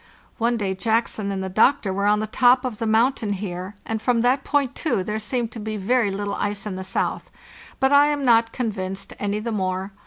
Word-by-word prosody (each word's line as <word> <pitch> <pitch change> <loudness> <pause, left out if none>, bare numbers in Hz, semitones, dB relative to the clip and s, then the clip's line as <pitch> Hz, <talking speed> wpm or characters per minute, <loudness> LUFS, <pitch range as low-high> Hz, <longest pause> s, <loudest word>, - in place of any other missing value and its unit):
One 235 +1 +1
day 195 -3 -1
Jackson 220 0 -1
and 190 -1 -3
the - - -3
doctor 215 +1 +3
were 200 +1 0
on 210 +1 +3
the - - -1
top 250 +3 +3
of 235 -4 -4
the 225 - -1
mountain 225 -1 +2
here, 190 0 -5
and 220 -1 -3
from 240 -1 +2
that 255 +3 +2
point, 285 -4 0
too, 300 - -1
there 210 +3 -3
seemed 230 +2 -2
to 225 - -8
be 215 0 -4
very 225 +2 +1
little 200 +1 -3
ice 205 0 -3
in 205 -3 -4
the 190 - -5
south; - - -2 0.5
but 265 +1 +3
I 285 +1 +7
am 290 -2 -1
not 230 -2 +4
convinced 195 -5 -4
any 205 0 -1
the 225 +2 -3
more. 190 -1 -2
215 Hz, 220 wpm, -23 LUFS, 200-245 Hz, 0.5 s, I